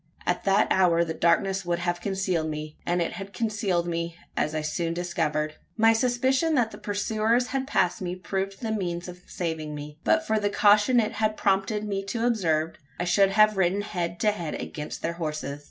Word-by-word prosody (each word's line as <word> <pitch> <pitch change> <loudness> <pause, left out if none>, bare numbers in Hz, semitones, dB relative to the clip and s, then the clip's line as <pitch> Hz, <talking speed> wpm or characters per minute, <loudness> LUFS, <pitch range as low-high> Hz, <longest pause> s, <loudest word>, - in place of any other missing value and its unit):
At 180 0 -1
that 200 +2 +4
hour 175 -3 +4
the 160 - -3
darkness 190 +4 +2
would 175 -1 0
have 175 0 -2
concealed 185 -4 -1
me. 150 0 -5
And 175 0 +2
it - - -3
had 200 0 -8
concealed 205 -6 0
me, 170 0 -3 0.2
as 155 +1 0
I 155 - 0
soon 165 +2 -1
after 175 - -3
discovered. 155 -3 -1 0.2
My 225 0 +6
suspicion 260 +7 +2
that 235 -4 +2
the - - -10
pursuers 220 +4 0
had 265 0 -2
passed 180 -10 +1
me 180 -1 -3
proved 195 +1 -4
the 225 - -1
means 175 -4 -2
of 180 0 -9
saving 160 -3 -4
me. 150 +1 -8
But 320 0 +3
for 220 0 +1
the 205 -1 0
caution 210 +4 +5
it 215 -2 +1
had 215 0 -1
prompted 200 +1 +1
me 195 -1 -2
to 225 +4 -2
observe, 165 -9 +1 0.2
I - - 0
should 195 +2 +4
have 215 -1 +5
ridden 190 +2 +2
head 175 -4 -3
to 210 - +4
head 170 -7 -4
against 150 -1 -6
their 165 - -1
horses! 155 -4 -4
190 Hz, 200 wpm, -26 LUFS, 170-215 Hz, 0.2 s, My